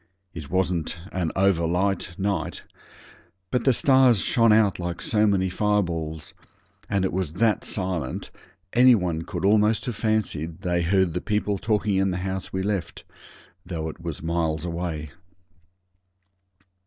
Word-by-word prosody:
It 75 -4 -8
wasn't 90 -3 0
an 90 -4 -1
over 95 -3 +3
light 90 +1 -1
night, 100 0 -2 0.9
but 125 - 0
the 135 - +6
stars 130 -4 +4
shone 115 -2 +3
out 105 -3 +3
like 85 -1 -4
so 110 -1 +2
many 95 -2 +2
fireballs, 85 -6 -1 0.6
and 100 -2 +1
it - - -2
was 90 -4 -2
that 110 +4 +1
silent 90 -9 -3 0.4
any 125 +1 +7
one 90 -5 -1
could 85 - -4
almost 105 +1 +3
have 120 - -3
fancied 95 -7 -1
they 90 -2 0
heard 90 0 +2
the 90 - -2
people 105 -1 -1
talking 105 -2 0
in 95 0 +2
the 90 - -2
house 95 -1 -4
we 95 0 -2
left, 100 -3 -3 0.6
though 80 -3 -4
it - - -10
was 85 -3 -6
miles 80 -1 -1
away. 85 -4 -4
95 Hz, 145 wpm, -24 LUFS, 85-105 Hz, 0.9 s, any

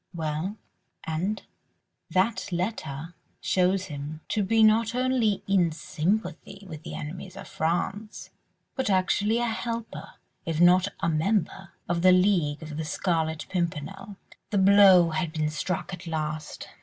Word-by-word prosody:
"Well? 160 +5 -3 0.5
And?" 180 +7 -2 0.7
"That 190 +1 0
letter 170 -4 -3 0.3
shows 185 +1 +1
him 150 -1 -7
to 215 - +1
be 225 +3 +3
not 225 +2 +4
only 250 -5 +1
in 185 -4 +3
sympathy 195 +5 -3
with 155 -4 -8
the 165 - -7
enemies 180 +5 -7
of - - -9
France, 190 +6 -3 0.4
but 265 -5 -1
actually 200 +3 +2
a 240 - +1
helper, 230 0 -4 0.3
if 165 -1 -3
not 180 +2 +6
a - - +1
member, 190 +3 -1
of 170 0 0
the 185 +1 +6
League 180 -6 +2
of 155 -1 -7
the 160 - -2
Scarlet 160 -1 -1
Pimpernel." 190 +3 -4 0.3
The 205 - 0
blow 190 -3 +7
had 155 0 -2
been 155 -1 -1
struck 170 +4 -3
at 180 0 -8
last. 155 -1 -4
180 Hz, 140 wpm, -26 LUFS, 160-205 Hz, 0.7 s, blow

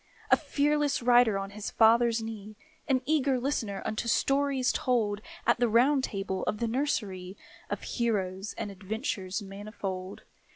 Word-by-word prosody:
A - - +9
fearless 290 -2 0
rider 240 -4 +5
on 195 0 -4
his 210 +1 -5
father's 230 0 +4
knee, 215 -1 -7 0.3
An 260 -2 +2
eager 275 -3 +2
listener 225 -7 -2
unto 215 +2 -2
stories 275 +1 +2
told 230 -8 0 0.2
At 235 0 +3
the 240 -1 +3
Round 260 +5 +4
Table 195 -5 -3
of 210 - 0
the 235 - -1
nursery, 210 -8 -2 0.3
Of 205 - -4
heroes 195 -4 -2
and 205 - -4
adventures 195 0 -4
manifold. 195 -1 -6
225 Hz, 140 wpm, -29 LUFS, 200-255 Hz, 0.3 s, A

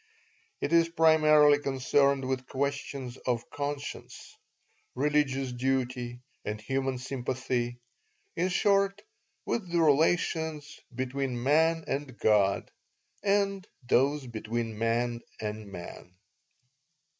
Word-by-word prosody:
It 155 - -1
is 165 0 +5
primarily 155 -3 +5
concerned 140 0 +1
with 130 -1 -2
questions 140 -2 -3
of 120 -2 -2
conscience, 145 0 -6 0.6
religious 135 -2 +1
duty, 125 -1 -2 0.2
and 105 0 -4
human 135 +3 -1
sympathy 125 -1 -2 0.6
in 180 +2 +1
short, 195 +1 +2 0.4
with 185 -7 -2
the 170 - +2
relations 160 0 +1 0.2
"between 130 -1 -2
man 160 +4 +3
and 135 -3 -4
God" 100 -2 +2 0.5
and 195 -1 +1 0.2
those 140 +3 +2
"between 115 -1 -4
man 115 +1 0 0.2
and 105 -1 -5
man." 90 0 -10
135 Hz, 100 wpm, -29 LUFS, 120-155 Hz, 0.6 s, is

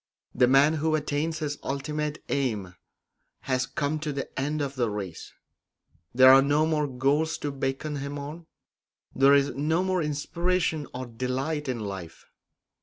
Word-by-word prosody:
The 125 0 +4
man 135 +4 +5
who 155 0 +2
attains 155 +1 -1
his 150 -2 -3
ultimate 150 +2 -3
aim 110 -10 -1 0.7
has 130 0 -1
come 150 -1 -2
to 150 0 -3
the 140 -1 -4
end 150 +3 -1
of 140 -2 -2
the 120 -3 0
race; 100 -5 -6 0.8
there 130 +1 +8
are 135 - +8
no 145 +3 +2
more 155 -2 +1
goals 140 +5 +1
to 145 - -3
beckon 135 +2 -3
him 140 +1 -5
on; 155 +4 -8 0.7
there 135 +1 +6
is 140 0 +2
no 160 +5 0
more 185 -1 0
inspiration 160 +1 -1
or 130 +1 -5
delight 130 +5 -3
in 125 -2 -2
life. 95 -5 -7
140 Hz, 155 wpm, -27 LUFS, 130-155 Hz, 0.8 s, there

